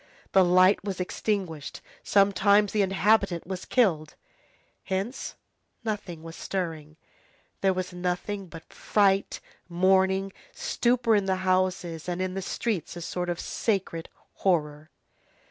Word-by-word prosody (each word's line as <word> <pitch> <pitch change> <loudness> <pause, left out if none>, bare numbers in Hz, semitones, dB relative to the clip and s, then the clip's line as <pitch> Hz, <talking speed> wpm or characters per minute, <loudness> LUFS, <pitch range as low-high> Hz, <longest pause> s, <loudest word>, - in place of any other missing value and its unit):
The 190 - +6
light 185 +3 +5
was 195 -2 -4
extinguished, 180 -5 -3 0.2
sometimes 200 +1 +4
the 210 - +1
inhabitant 195 -2 +2
was 185 +1 -5
killed. 165 -11 +1 0.7
Hence 195 +7 -3 0.5
nothing 200 -7 -4
was 165 0 -9
stirring. 160 -5 -4 0.6
There 195 - +4
was 185 0 -3
nothing 180 +2 -3
but 165 -1 -12
fright, 195 -2 +1 0.3
mourning, 190 +2 +2 0.2
stupor 240 -1 +1
in 200 -2 +2
the 190 -1 +1
houses; 185 -3 0
and 175 0 -2
in 185 0 -2
the 195 - -3
streets, 195 -2 -3
a 175 - -7
sort 180 +1 -3
of 175 - -2
sacred 190 -6 -2 0.3
horror. 155 -4 0
185 Hz, 125 wpm, -27 LUFS, 175-200 Hz, 0.7 s, The